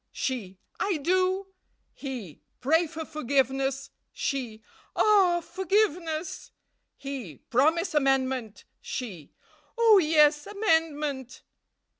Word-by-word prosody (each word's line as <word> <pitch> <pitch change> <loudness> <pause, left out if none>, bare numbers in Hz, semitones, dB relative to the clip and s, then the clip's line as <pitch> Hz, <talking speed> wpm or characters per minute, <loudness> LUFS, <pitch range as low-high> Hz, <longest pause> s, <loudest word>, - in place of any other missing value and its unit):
"She. 210 -8 -4 0.2
'I 395 -5 0
do.' 370 +5 +1 0.5
"He. 245 - -7 0.2
'Pray 320 +6 +2
for 320 +1 -6
forgiveness.' 270 -1 -1 0.2
"She. 240 -6 -3 0.3
'Ah, 380 -5 +4
forgiveness!' 355 -3 -1 0.5
"He. 265 - -7
'Promise 320 +8 +2
amendment.' 265 -6 0 0.2
"She. 240 - -6 0.5
'Oh, 450 -3 +7
yes, 300 -2 +4
amendment!' 310 - -1
295 Hz, 85 wpm, -27 LUFS, 265-350 Hz, 0.5 s, Oh